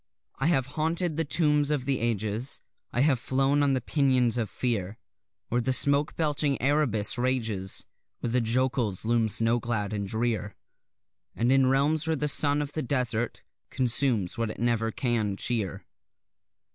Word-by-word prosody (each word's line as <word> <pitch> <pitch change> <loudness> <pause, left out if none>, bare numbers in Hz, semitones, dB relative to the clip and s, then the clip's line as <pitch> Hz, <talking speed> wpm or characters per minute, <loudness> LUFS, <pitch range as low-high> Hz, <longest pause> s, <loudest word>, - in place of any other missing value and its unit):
I 135 - +1
have 140 -7 +2
haunted 160 +4 -1
the 165 - 0
tombs 150 0 +2
of 145 -4 -1
the 135 -1 0
ages, 115 +2 -2 0.3
I 120 - 0
have 140 -3 +3
flown 135 +3 +1
on 140 -1 +2
the 130 - 0
pinions 130 -4 +1
of 115 -4 -2
fear 110 -3 -2 0.5
Where 120 +1 0
the 130 - -1
smoke 140 +3 +2
belching 150 -3 0
Erebus 125 -6 +2
rages; 115 -7 -2 0.3
Where 120 - -3
the 125 +1 +2
jokuls 115 -3 0
loom 115 -1 +1
snow 115 +3 +4
clad 110 -3 -3
and 100 -1 -3
drear: 110 -1 -2 0.8
And 120 +2 +1
in 135 -1 +4
realms 145 +4 +2
where 160 - +1
the 150 0 -1
sun 145 0 +3
of 145 0 -8
the 155 - -2
desert 120 -4 -2 0.3
consumes 120 -6 0
what 115 -1 -1
it - - -7
never 115 -1 0
can 110 -6 -1
cheer. 110 -6 -2
125 Hz, 160 wpm, -27 LUFS, 115-140 Hz, 0.8 s, snow